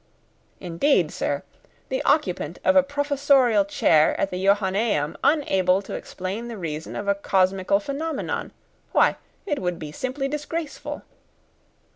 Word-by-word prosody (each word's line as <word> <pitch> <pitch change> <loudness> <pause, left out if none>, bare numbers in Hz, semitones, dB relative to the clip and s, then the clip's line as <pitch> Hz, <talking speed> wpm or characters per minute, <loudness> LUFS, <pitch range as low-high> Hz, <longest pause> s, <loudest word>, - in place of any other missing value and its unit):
"Indeed, 180 - +1
sir! - - -2 0.5
The - - -1
occupant - - +1
of 285 - +4
a 280 - +8
professorial 280 -5 +2
chair 160 -5 +3
at 195 - 0
the 180 +1 -3
Johannæum 195 -5 +1
unable 195 - +2
to - - -8
explain 195 +6 -5
the 235 -2 -6
reason 160 -3 -5
of 200 - -4
a 200 - +4
cosmical 195 0 +1
phenomenon! 285 +6 -3 0.4
Why, - - +4 0.3
it 295 -8 -1
would 180 -1 -2
be 150 -2 -7
simply 260 - -3
disgraceful!" 300 +2 -5
205 Hz, 130 wpm, -24 LUFS, 185-280 Hz, 0.5 s, a